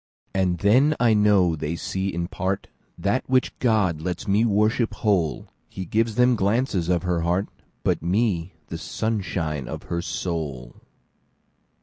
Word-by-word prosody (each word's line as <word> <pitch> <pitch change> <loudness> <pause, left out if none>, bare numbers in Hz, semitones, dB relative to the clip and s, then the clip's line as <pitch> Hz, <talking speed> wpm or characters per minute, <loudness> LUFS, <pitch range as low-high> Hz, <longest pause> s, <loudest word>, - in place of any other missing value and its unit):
And 95 -2 +1
then 130 - +4
I 120 -2 +4
know 100 -5 +4
they 75 +2 -3
see 95 +3 -3
in 85 0 -3
partThat 100 +4 -3
which 130 0 +2
God 105 -10 +2
lets 90 +5 -4
me 100 +3 +3
worship 110 +2 +1
whole:He 85 - -2
gives 115 0 0
them 125 +1 +4
glances 100 -4 0
of 90 -1 +1
her 90 -2 0
heart, 90 +4 0 0.3
But - - +1
me, 90 -2 0 0.2
the 80 - -5
sunshine 90 - -2
of - - -6
her 85 - 0
soul. 75 -9 -4
95 Hz, 135 wpm, -24 LUFS, 85-110 Hz, 0.3 s, then